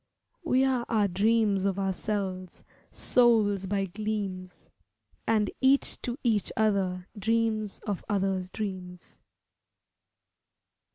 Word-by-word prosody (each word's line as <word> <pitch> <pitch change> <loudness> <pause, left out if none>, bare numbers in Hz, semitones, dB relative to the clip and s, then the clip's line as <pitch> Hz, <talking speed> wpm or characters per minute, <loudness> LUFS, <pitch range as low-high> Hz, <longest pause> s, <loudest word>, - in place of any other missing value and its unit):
We 265 -5 +3
are 255 -2 +1
our 215 -3 +3
dreams 205 +1 +2
of 195 -1 0
ourselves, 190 -1 -3 0.3
souls 215 -6 +3
by 195 0 0
gleams, 195 -2 -5 0.6
And 215 -2 +2
each 270 +1 +3
to 245 0 -3
each 220 -5 +1
other 195 -4 +1
dreams 220 -1 0
of 205 -4 -3
others' 190 -2 0
dreams. 185 -4 -6
205 Hz, 100 wpm, -28 LUFS, 190-220 Hz, 0.6 s, We